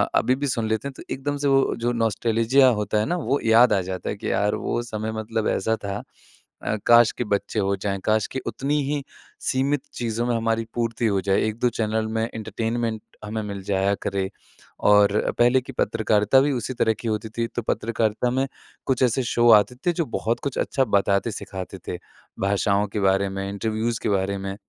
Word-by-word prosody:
अभी 130 - +3
भी 145 +1 -2
सुन 115 -3 -1
लेते 110 +5 -1
हैं 140 - -7
तो - - -9
एकदम 145 +2 -3
से 140 0 -1
वो 135 0 +3
जो 120 +1 0
नॉस्टेल्जिया 115 +3 +3
होता 105 0 0
है 105 - +1
ना 175 - -1
वो 145 -4 0
याद 115 0 +6
आ 95 - +2
जाता 95 0 -5
है, - - -2
कि - - -3
यार 105 +1 +1
वो - - -2
समय 110 -1 -4
मतलब 110 0 -2
ऐसा 110 +4 +1
था 100 +1 -3 0.6
अ, - - 0
काश 120 -1 +7
के 125 - -3
बच्चे 100 +1 -1
हो 100 0 +1
जाएँ। 100 0 -3
काश 110 -1 +2
की 130 - -2
उतनी 140 +6 -1
ही 145 -1 -1 0.4
सीमित 135 +2 0
चीज़ों 115 0 -2
में 120 - +1
हमारी 115 0 0
पूर्ति 115 0 -1
हो 100 -2 +1
जाए, 95 0 +1
1-2 110 +3 0
चैनल 110 -1 -1
में 110 0 -1
एंटरटेनमेंट 110 +1 -2 0.2
हमें 110 +1 -3
मिल 100 -2 -5
जाया 100 +1 +1
करे। 95 -1 -1 0.6
और 105 0 +4
पहले 120 +2 +5
की 135 - -9
पत्रकारिता 110 +1 +2
भी 145 +1 +2
उसी 125 0 -3
तरह 115 -2 +2
की 115 - -5
होती 110 0 -2
थी, 115 +1 -2
तो 120 - -4
पत्रकारिता 115 +1 0
में 135 +2 0 0.4
कुछ 130 -1 +1
ऐसे 125 +1 +2
शो 120 0 +3
आते 105 +2 +5
थे, - - +5
जो 170 -1 -1
बहुत 115 -1 -2
कुछ 140 -3 -3
अच्छा 135 -1 +1
बताते-सिखाते 100 -2 -1
थे। 90 - -3 0.4
भाषाओं 100 +1 +1
के 105 - -1
बारे 95 0 +2
में, 95 0 -4
इंटरव्यूज़ 110 +3 -2
के - - 0
बारे 100 0 0
में। 95 0 -5
110 Hz, 200 wpm, -24 LUFS, 100-120 Hz, 0.6 s, काश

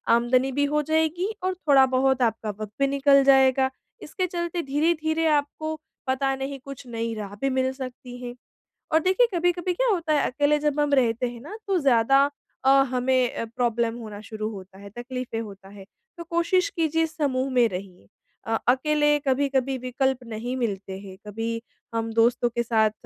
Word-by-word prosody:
आमदनी 250 +3 +2
भी 285 +2 +1
हो 300 +1 +1
जाएगी 320 +6 0
और 370 0 0
थोड़ा 280 -6 +5
बहुत 260 0 +1
आपका 225 -2 0
वक़्त 210 -1 -6
भी 275 - +3
निकल 275 0 +4
जाएगा। 265 -1 +5 0.3
इसके 370 - -2
चलते 345 0 -3
धीरे-धीरे 315 +3 0
आपको 310 +1 0 0.3
पता 270 +1 +1
नहीं 270 +1 -5
कुछ 275 -1 -9
नई 230 -1 -3
राह 205 -2 -6
भी 275 - +1
मिल 260 0 +1
सकती 255 -1 -8
है। 245 0 -6 0.6
और 320 - +6
देखिए 380 +8 +3
कभी-कभी 355 +1 0
क्या - - 0
होता 335 -7 +1
है, 295 - +3
अकेले 290 +3 +2
जब 295 0 0
हम 295 -1 +1
रहते 245 -2 +2
हैं 240 -1 -10
ना, 330 - -8
तो 390 -2 +2
ज़्यादा 270 0 +4 0.4
अ, - - +6 0.2
हमें 255 -1 +1
अ, - - -2
प्रॉब्लम 235 -1 -1
होना 215 -3 -8
शुरू 215 0 -5
होता 190 -2 -11
है, 200 +1 -11
तकलीफ़ें 250 -1 -5
होता 200 -3 -10
है, 200 -1 -12 0.3
तो 340 - -6
कोशिश 340 +3 +1
कीजिए 325 -3 +1
समूह 275 -5 -1
में 245 -2 +4
रहिए। 180 - -8 0.4
अ 225 - +1
अकेले 295 +3 +3
कभी-कभी 270 0 +1
विकल्प 255 +1 -1
नहीं 230 +2 -5
मिलते 195 -5 -3
हैं, 190 -1 -11
कभी 225 +2 -3 0.3
हम 225 0 -1
दोस्तों 235 +1 +3
के 235 +1 -1
साथ 220 -2 +2
265 Hz, 175 wpm, -25 LUFS, 230-300 Hz, 0.6 s, और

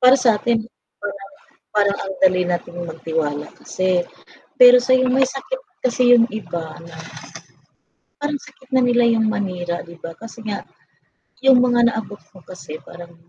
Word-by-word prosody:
Para 255 +1 +7
sa 245 -5 +3
atin. 230 +1 0 0.4
Parang 200 -1 -7 0.5
parang 200 -1 +2
ang 195 0 -5
dali 185 -1 +4
nating 175 0 -4
magtiwala 160 -2 -3
kasi. 185 -1 -1 0.7
sa 255 +1 0
yung 255 0 +2
may 265 0 +4
sakit 275 - -6 0.2
kasi 245 -1 +4
yung 230 -1 +5
iba 170 -7 -5
na, 170 -1 -12 1.2
parang 290 0 -1
sakit 265 -1 -15
na 255 - +4
nila 245 0 +3
yung 220 -1 +1
manira 175 -5 -3
'di 170 0 -14
ba? 165 0 -8
Kasi 230 +3 -11
nga 205 - -4 0.8
yung 255 -2 +7
mga 240 -1 +4
naabot 210 -2 -6
ko 185 -3 -17
kasi 160 -4 -9
parang, 170 0 -12
205 Hz, 155 wpm, -20 LUFS, 175-245 Hz, 1.2 s, Para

